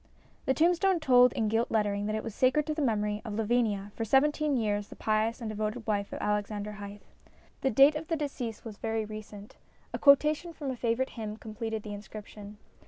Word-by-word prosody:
The 265 - +3
tombstone 355 +2 +3
told 250 -4 +6
in 220 - 0
gilt 225 +2 +1
lettering 205 -2 0
that 215 - -1
it 220 - -3
was 225 - -6
sacred 260 +6 +2
to 310 - -1
the 305 - -3
memory 210 -4 0
of 215 -4 -5
Lavinia, 215 -3 0
for 225 - -2
seventeen 290 +4 +2
years 205 -3 -1
the - - -11
pious 220 +2 0
and 230 - -5
devoted 215 +2 -3
wife 205 -2 -1
of - - -5
Alexander 210 0 -2
Hythe. 205 0 -9 0.6
The 270 - +2
date 275 +5 +6
of 310 +1 -5
the 330 - 0
decease 260 -8 -4
was 215 -3 -8
very 225 0 -2
recent. 210 -1 -10 0.4
A - - -3
quotation 300 +4 +4
from 285 -4 -4
a - - -4
favourite 240 +2 -1
hymn 215 -2 -6
completed 220 0 -5
the 210 - -6
inscription. 205 0 -10
225 Hz, 200 wpm, -29 LUFS, 210-265 Hz, 0.6 s, told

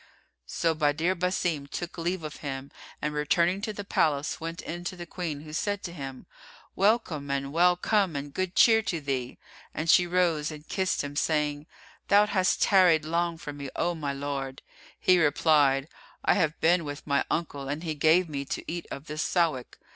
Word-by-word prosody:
So 165 -1 0
Badr 155 +3 +1
Basim 175 -5 -1
took 175 +3 -5
leave 175 +1 -2
of 150 -1 -6
him 135 -1 -6 0.3
and 150 0 -1
returning 170 +6 +1
to 220 +1 -2
the 205 -1 -6
palace, 150 -7 0
went 165 +1 -5
in 175 +2 -6
to 185 - -3
the 175 -1 -7
Queen, 165 -5 -5
who 150 0 -11
said 205 +5 -2
to 170 - -6
him, 135 -5 -7 0.5
"Welcome 195 -9 +1
and 140 0 -2
well 180 +2 +5
come 195 -2 +1
and 140 0 -5
good 185 -1 -2
cheer 225 -1 +6
to 175 -6 -2
thee!" 135 -4 -3 0.4
And 160 +1 +2
she 180 - +5
rose 170 -4 +1
and 150 -1 -10
kissed 190 -4 0
him, 145 0 -6
saying, 150 0 0 0.4
"Thou 205 +1 +6
hast 190 -3 +1
tarried 180 -6 +5
long 170 +1 0
from 145 -2 -8
me, 140 -1 -6
O 175 - 0
my 150 -4 -3
lord." 140 -1 -4 0.4
He 185 -1 +4
replied, 145 -3 +3 0.4
"I - - +5
have 160 -5 0
been 170 +1 +3
with 145 -1 -7
my 140 -1 +2
uncle, 145 -4 -3
and 150 +4 -3
he 160 -2 -2
gave 160 +4 +3
me 140 -3 -4
to - - -5
eat 170 +1 -4
of 140 - -7
this 155 -1 -4
Sawik." 160 -10 0
160 Hz, 190 wpm, -27 LUFS, 145-180 Hz, 0.5 s, cheer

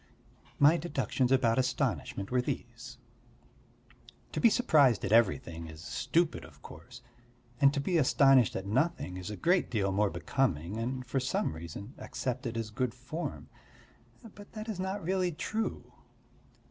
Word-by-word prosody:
My 150 +4 +6
deductions 140 -5 -1
about 130 -3 +3
astonishment 125 - -1
were 125 0 +2
these: 125 0 -6 1.3
"To - - -3
be 230 - +7
surprised 150 - +3
at 95 - -3
everything 95 -7 +2
is 80 0 -11
stupid 170 - 0
of - - -16
course, 120 +11 -12 0.6
and 140 -1 +6
to 145 - -2
be 170 +4 +1
astonished 135 -3 +5
at 95 - -4
nothing 130 - 0
is 90 +1 -6
a 105 - -5
great 175 +1 +2
deal 100 -5 0
more 100 +1 +2
becoming 95 - -1
and 125 +2 -3
for 130 +3 -1
some 130 - -1
reason 85 +8 -8
accepted 125 -2 -4
as 110 -2 -4
good 125 +2 -2
form. 130 +7 -6 0.9
But 205 0 -14
that 215 0 -7
is 210 -5 -4
not 190 +1 -3
really 185 +1 0
true. 220 +8 -4
125 Hz, 145 wpm, -30 LUFS, 105-155 Hz, 1.3 s, be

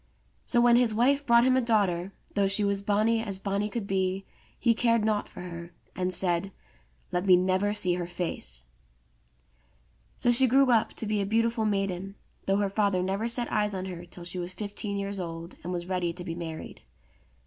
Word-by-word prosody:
So 240 - +2
when 240 0 +6
his 240 -3 +3
wife 275 +5 +2
brought 235 0 +6
him 255 0 +4
a 260 - +3
daughter, 200 -6 +1 0.2
though 200 -1 +2
she 200 +2 +2
was 200 -1 0
bonny 215 +3 +2
as 200 -4 -4
bonny 200 +1 -2
could 230 -2 -4
be, 190 0 -1 0.3
he 235 - +3
cared 230 -1 +2
nought 215 -1 0
for - - -10
her, 170 -1 -8 0.2
and 185 0 -1
said: 180 +1 0 0.6
*'Let 180 +2 -1
me 185 - +8
never 185 +3 +2
see 185 -4 +2
her 175 -1 -3
face." 60 - -4 1.5
So 240 - +3
she 260 +2 +4
grew 265 +1 +4
up 230 -2 +2
to - - -4
be 210 -1 0
a - - -1
beautiful 230 +1 +1
maiden, 195 -2 -2 0.3
though 195 0 +3
her 200 -1 +1
father 200 -3 +1
never 195 +4 -1
set 235 0 -2
eyes 210 -1 +1
on 185 0 -3
her 175 -2 -6
till 175 0 -11
she 180 +1 -3
was 175 +1 -4
fifteen 205 0 -4
years 200 0 -3
old 165 0 -6
and 180 - -4
was 175 -1 -3
ready 180 -2 -1
to 180 +1 -7
be 165 - -4
married. 165 -2 -7
200 Hz, 200 wpm, -28 LUFS, 180-220 Hz, 1.5 s, me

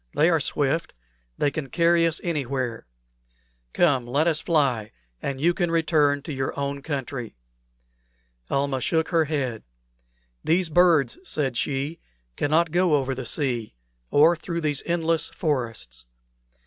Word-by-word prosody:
They 160 +4 +4
are 165 - +3
swift. 145 - -1 0.4
They 145 - +1
can 140 -3 -5
carry 170 +3 +3
us 165 - -1
anywhere. 135 - -2 0.8
Come, 135 -8 +2
let 140 +6 +1
us 160 -2 +1
fly, 135 -10 +1 0.3
and 135 -1 -3
you 170 +5 +3
can 175 -1 -1
return 150 -4 +2
to 155 - -5
your 130 +1 -3
own 140 0 -3
country." 135 -5 -5 1.1
Almah 140 -1 0
shook 160 +3 +1
her 165 -2 +3
head. 135 -7 -2 0.8
"These 175 +1 +2
birds," 175 - +3
said 145 - -1
she, 140 +6 -2 0.4
"cannot 160 +3 +2
go 175 -2 +3
over 135 -2 0
the 130 -2 -6
sea, 120 - -2 0.3
or 160 +4 +5
through 170 +1 -4
these 150 -3 0
endless 165 -1 +1
forests. 115 - -3
145 Hz, 135 wpm, -25 LUFS, 135-165 Hz, 1.1 s, or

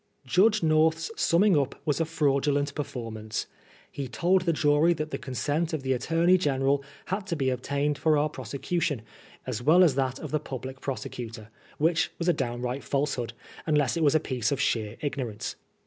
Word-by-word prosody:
Judge 200 - +3
North's 160 +1 +2
summing 185 +3 +4
up 140 -2 0
was 150 0 +1
a - - +2
fraudulent 145 -2 +1
per 150 - -2
formance. 110 -5 -5 0.5
He 140 -2 -4
told 180 +8 +2
the 170 -1 +1
jury 150 +2 +3
that 155 -1 -4
the - - -3
consent 145 +6 -2
of 155 -4 -2
the 130 0 +1
Attorney 165 +7 +3
General 140 -3 +1 0.2
had 190 +1 -3
to 170 - -1
be 135 -4 +1
obtained 140 +3 -1
for 155 -2 +3
our 150 +1 +2
prosecu 140 +5 -4
tion, 145 -10 -1 0.4
as 120 -3 -3
well 165 +8 +6
as 165 -6 +5
that 130 -1 -1
of - - -7
the 155 - +1
Public 130 -2 -7
Prosecutor, 115 -4 -6 0.3
which 165 +2 +2
was 170 - -3
a 175 - +5
downright 125 0 -3
falsehood, 135 -5 -1 0.3
unless 150 -4 +2
it 165 - -1
was 145 0 +4
a - - +5
piece 125 -5 -1
of 140 - 0
sheer 110 -1 0
ignorance. 125 -7 -3
145 Hz, 185 wpm, -27 LUFS, 130-160 Hz, 0.5 s, well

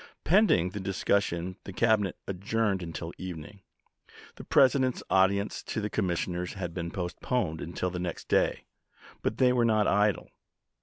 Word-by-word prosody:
Pending 165 - +4
the 100 - -5
discussion 95 -2 -1
the - - -8
Cabinet 105 -2 +2
adjourned 100 +1 -1
until 85 0 -6
evening. 95 +2 -8 0.7
The - - -10
President's 130 -1 +3
audience 100 +2 +2
to - - -3
the 105 -1 -3
commissioners 90 -2 -1
had 90 -4 -5
been 85 0 -4
postponed 90 0 -2
until 85 +3 -3
the 90 - -4
next 90 -1 -5
day; - - +1 0.6
but - - -2
they 125 -1 +4
were 120 -1 +2
not 110 -2 +3
idle. 105 0 +1
95 Hz, 145 wpm, -29 LUFS, 90-110 Hz, 0.7 s, Pending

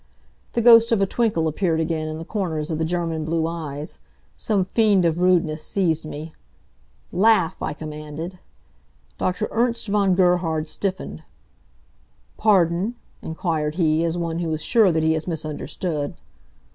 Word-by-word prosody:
The 235 - 0
ghost 230 -1 +7
of 225 - +3
a 195 - +3
twinkle 200 -6 0
appeared 160 +1 0
again 160 -1 -1
in 155 0 -4
the 165 - -7
corners 165 -7 -3
of 155 - -2
the 160 - +1
German 165 -2 -2
blue 160 +1 0
eyes. 155 -3 -5 0.4
Some 200 -5 0
fiend 200 -2 +3
of 165 0 +1
rudeness 170 -4 +2
seized 165 -5 0
me. 155 +1 -7 0.8
"Laugh!" 195 -2 +3
I - - -2
commanded. 155 +3 -7 0.8
Dr. 185 +4 -1
Ernst 235 0 0
von 200 -2 +3
Gerhard 175 -4 +2
stiffened. 190 +3 -3 1.1
"Pardon?" 195 +1 +2 0.3
inquired 160 -2 -2
he, 160 -2 +2
as 170 +1 -1
one 170 -1 -2
who 165 -2 -2
is 155 - -4
sure 220 -6 +4
that 160 -1 0
he 160 0 +3
has 160 +1 -3
misunderstood. 155 -1 -3
170 Hz, 145 wpm, -23 LUFS, 160-195 Hz, 1.1 s, ghost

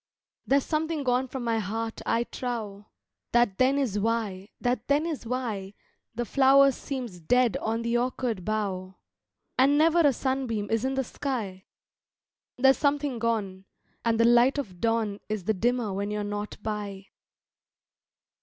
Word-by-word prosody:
There's 275 0 +3
something 315 -1 -1
gone 255 0 +1
from 255 0 -5
my 230 -1 +1
heart 225 +2 -4
I 230 +1 +2
trow! 220 -5 -5 0.5
That 240 -5 +3
then 260 +2 +4
is 235 -8 0
why, 210 -3 -1
that 245 -2 -1
then 290 +3 +2
is 310 -8 -4
why 220 -6 -3 0.4
The 240 +1 -2
flower 275 +2 +5
seems 250 -9 -6
dead 245 +7 +2
on 225 +1 -2
the 235 +1 +1
orchard 245 -5 -2
bough, 190 -3 -2 0.6
And 275 +3 +5
never 325 +2 +4
a 295 -4 +5
sunbeam 255 -5 -2
is 225 +1 +1
in 265 +1 0
the 265 - +1
sky. 220 -8 -4 0.9
There's 265 +1 +5
something 285 -4 0
gone, 205 -5 -2 0.4
And 230 -1 +1
the 230 - +5
light 240 +4 +5
of 280 -7 -2
the - - -15
dawn 220 +1 -1
Is 215 -3 -2
the 220 - +1
dimmer 235 +1 0
when 200 +1 -2
you're 210 0 -2
not 205 0 -4
by. 205 -3 -4
230 Hz, 155 wpm, -27 LUFS, 210-265 Hz, 0.9 s, flower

